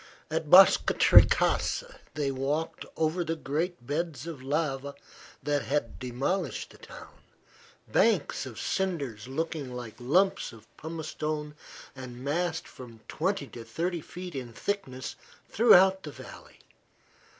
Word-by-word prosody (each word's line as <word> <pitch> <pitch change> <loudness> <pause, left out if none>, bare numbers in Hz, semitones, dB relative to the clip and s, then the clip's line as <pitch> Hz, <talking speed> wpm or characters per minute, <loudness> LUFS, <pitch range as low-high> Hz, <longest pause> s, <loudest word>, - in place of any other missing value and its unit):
At - - -2
Boscatrecasa - - +5 0.2
they 145 -2 0
walked 140 +5 -2
over 160 +2 +1
the 165 0 -2
great 160 -1 -3
beds 150 0 -3
of 165 -6 -7
lava 140 0 -2 0.5
that 145 -1 +1
had 135 -5 -2
demolished 130 +10 -2
the - - -17
town - - -13 0.7
banks 200 -10 +2
of 120 -3 -9
cinders 140 - -2
looking 150 -1 -3
like 120 -3 -6
lumps 175 +11 +2
of 110 -1 -14
pumice 160 0 -6
stone 150 -1 -3 0.4
and 130 -2 -8
massed 160 +3 -1
from 115 -3 -12
twenty 185 -1 -1
to 120 - -9
thirty 165 +9 -2
feet 180 +3 -8
in 125 -4 -6
thickness 130 - -4 0.3
throughout 190 -4 +6
the 150 - -7
valley. - - -12
150 Hz, 125 wpm, -29 LUFS, 130-170 Hz, 0.7 s, throughout